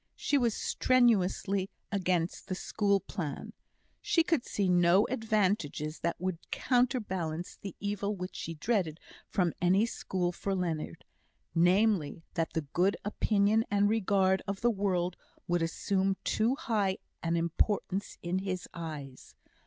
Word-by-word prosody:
She 290 Hz, -, 0 dB
was 235 Hz, -4 st, +1 dB
strenuously 200 Hz, -5 st, +2 dB, 0.2 s
against 180 Hz, -4 st, 0 dB
the 185 Hz, -, -2 dB
school 200 Hz, +1 st, +1 dB
plan. 160 Hz, -9 st, -5 dB, 0.5 s
She 330 Hz, -, +3 dB
could 325 Hz, -6 st, +1 dB
see 200 Hz, -2 st, -1 dB
no 180 Hz, +2 st, +5 dB
advantages 205 Hz, -, 0 dB
that 170 Hz, -, -2 dB
would 185 Hz, -2 st, -2 dB
counterbalance 190 Hz, -, 0 dB
the 195 Hz, -3 st, -6 dB
evil 205 Hz, 0 st, -2 dB
which 180 Hz, 0 st, -6 dB
she 165 Hz, -, -5 dB
dreaded 170 Hz, -3 st, 0 dB, 0.3 s
from 180 Hz, -4 st, +1 dB
any 185 Hz, +5 st, +4 dB
school 185 Hz, -6 st, -2 dB
for 195 Hz, +2 st, -2 dB
Leonard; 170 Hz, -4 st, -3 dB, 0.5 s
namely, 175 Hz, -2 st, +3 dB
that 165 Hz, -1 st, -1 dB
the 160 Hz, -, 0 dB
good 185 Hz, +3 st, +2 dB
opinion 210 Hz, +1 st, +2 dB
and 205 Hz, 0 st, +3 dB
regard 190 Hz, -3 st, +2 dB
of 195 Hz, 0 st, -3 dB
the 240 Hz, -, +4 dB
world 185 Hz, -4 st, 0 dB, 0.3 s
would 175 Hz, 0 st, +1 dB
assume 190 Hz, +3 st, 0 dB
too 230 Hz, +4 st, +1 dB
high 215 Hz, -, 0 dB, 0.2 s
an 165 Hz, 0 st, 0 dB
importance 190 Hz, +4 st, -1 dB
in 175 Hz, +2 st, 0 dB
his 185 Hz, -1 st, -3 dB
eyes. 150 Hz, -6 st, -8 dB
190 Hz, 135 wpm, -31 LUFS, 175-210 Hz, 0.5 s, no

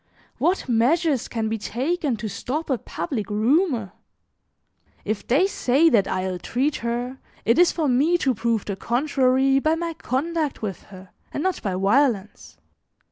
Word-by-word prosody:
What 365 Hz, -3 st, +1 dB
measures 260 Hz, +3 st, +2 dB
can 225 Hz, -2 st, -2 dB
be 220 Hz, 0 st, -2 dB
taken 270 Hz, -, -1 dB
to 215 Hz, +1 st, -4 dB
stop 285 Hz, -, -4 dB
a 255 Hz, -, +1 dB
public 215 Hz, -8 st, -4 dB
rumor? 230 Hz, -, +1 dB, 1.1 s
If 215 Hz, 0 st, -3 dB
they 285 Hz, +10 st, +4 dB
say 320 Hz, -4 st, +3 dB
that 205 Hz, -8 st, +3 dB
I 185 Hz, 0 st, -1 dB
ill 185 Hz, -1 st, -3 dB
treat 265 Hz, +10 st, -1 dB
her, 240 Hz, +3 st, -3 dB, 0.3 s
it 230 Hz, +6 st, +3 dB
is 355 Hz, -, +6 dB
for 320 Hz, -3 st, -1 dB
me 285 Hz, +7 st, +3 dB
to 265 Hz, -6 st, +1 dB
prove 230 Hz, -1 st, -1 dB
the 200 Hz, -, -3 dB
contrary 265 Hz, +3 st, +2 dB
by 310 Hz, +3 st, +2 dB
my 335 Hz, 0 st, -3 dB
conduct 305 Hz, 0 st, -2 dB
with 195 Hz, -4 st, -5 dB
her, 185 Hz, -1 st, -13 dB, 0.2 s
and 290 Hz, -, -3 dB
not 375 Hz, -2 st, -1 dB
by 195 Hz, -3 st, -2 dB
violence. 210 Hz, +1 st, 0 dB
255 Hz, 160 wpm, -23 LUFS, 220-305 Hz, 1.1 s, is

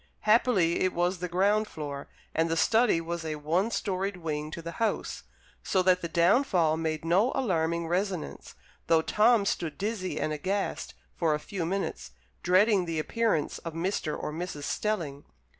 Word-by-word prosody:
Happily 210 Hz, -6 st, +3 dB
it 185 Hz, -, +1 dB
was 175 Hz, +1 st, 0 dB
the 180 Hz, -, -3 dB
ground 200 Hz, +5 st, +2 dB
floor, 145 Hz, -5 st, -6 dB, 0.3 s
and 165 Hz, +1 st, +1 dB
the 165 Hz, -, 0 dB
study 225 Hz, 0 st, +3 dB
was 170 Hz, 0 st, -4 dB
a 155 Hz, -1 st, -3 dB
one 165 Hz, +8 st, 0 dB
storied 195 Hz, -2 st, -2 dB
wing 155 Hz, -3 st, -3 dB
to 160 Hz, -, -7 dB
the 165 Hz, 0 st, -6 dB
house, 225 Hz, -, -1 dB, 0.4 s
so 190 Hz, -1 st, +1 dB
that 185 Hz, 0 st, +3 dB
the 170 Hz, -, -2 dB
downfall 170 Hz, -, +3 dB
made 160 Hz, 0 st, -2 dB
no 195 Hz, +10 st, +3 dB
alarming 170 Hz, -9 st, 0 dB
resonance, 185 Hz, 0 st, -3 dB, 0.3 s
though 160 Hz, -1 st, +4 dB
Tom 215 Hz, +2 st, +4 dB
stood 165 Hz, -5 st, -2 dB
dizzy 200 Hz, -2 st, -3 dB
and 155 Hz, -, -1 dB
aghast 190 Hz, +7 st, -2 dB, 0.2 s
for 160 Hz, -3 st, +1 dB
a -, -, -4 dB
few 170 Hz, +1 st, -4 dB
minutes, 195 Hz, -, -3 dB, 0.3 s
dreading 190 Hz, +1 st, +4 dB
the 165 Hz, -1 st, -3 dB
appearance 185 Hz, -1 st, 0 dB
of 165 Hz, -1 st, -7 dB
Mr. 165 Hz, -2 st, -2 dB
or 150 Hz, -, -4 dB
Mrs. 165 Hz, -3 st, -5 dB
Stelling. 160 Hz, -8 st, -2 dB
175 Hz, 165 wpm, -28 LUFS, 160-200 Hz, 0.4 s, though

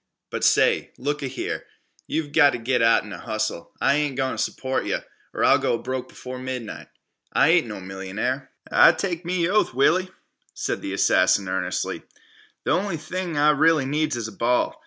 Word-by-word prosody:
But -, -, -3 dB
say, -, -, +3 dB
look 145 Hz, +3 st, -2 dB
a 135 Hz, -, -2 dB
here, 130 Hz, 0 st, -4 dB, 0.4 s
you've 155 Hz, -2 st, -2 dB
gota 145 Hz, -5 st, +5 dB
git 125 Hz, 0 st, +1 dB
out 115 Hz, 0 st, +4 dB
an' 105 Hz, -, -10 dB
hustle. 110 Hz, -6 st, -4 dB
I 140 Hz, -, +3 dB
ain't 145 Hz, -3 st, -1 dB
goin' 130 Hz, -1 st, -1 dB
t' -, -, 0 dB
support 130 Hz, 0 st, -2 dB
yeh, -, -, -1 dB, 0.3 s
or -, -, -2 dB
I'll -, -, +5 dB
go -, -, 0 dB
broke 130 Hz, +1 st, -5 dB
b'fore 125 Hz, 0 st, -8 dB
night. 130 Hz, -4 st, -6 dB, 0.5 s
I 145 Hz, -, +4 dB
ain't 165 Hz, -5 st, +4 dB
no 105 Hz, -3 st, -6 dB
millionaire." 95 Hz, +8 st, -4 dB, 0.2 s
"I -, -, +7 dB
take 175 Hz, -3 st, -3 dB
me 175 Hz, -1 st, 0 dB
oath, 200 Hz, -, +1 dB
Willie," 185 Hz, +8 st, +3 dB, 0.5 s
said -, -, -3 dB
the 95 Hz, -, -4 dB
assassin 95 Hz, 0 st, +3 dB
earnestly, 95 Hz, -1 st, -2 dB, 0.7 s
"th' -, -, -1 dB
on'y 180 Hz, 0 st, 0 dB
thing 170 Hz, +1 st, -4 dB
I 150 Hz, +1 st, +5 dB
really 155 Hz, -1 st, +3 dB
needs 150 Hz, +1 st, 0 dB
is 115 Hz, -2 st, -3 dB
a -, -, -8 dB
ball. 125 Hz, -, 0 dB
130 Hz, 180 wpm, -24 LUFS, 115-155 Hz, 0.7 s, I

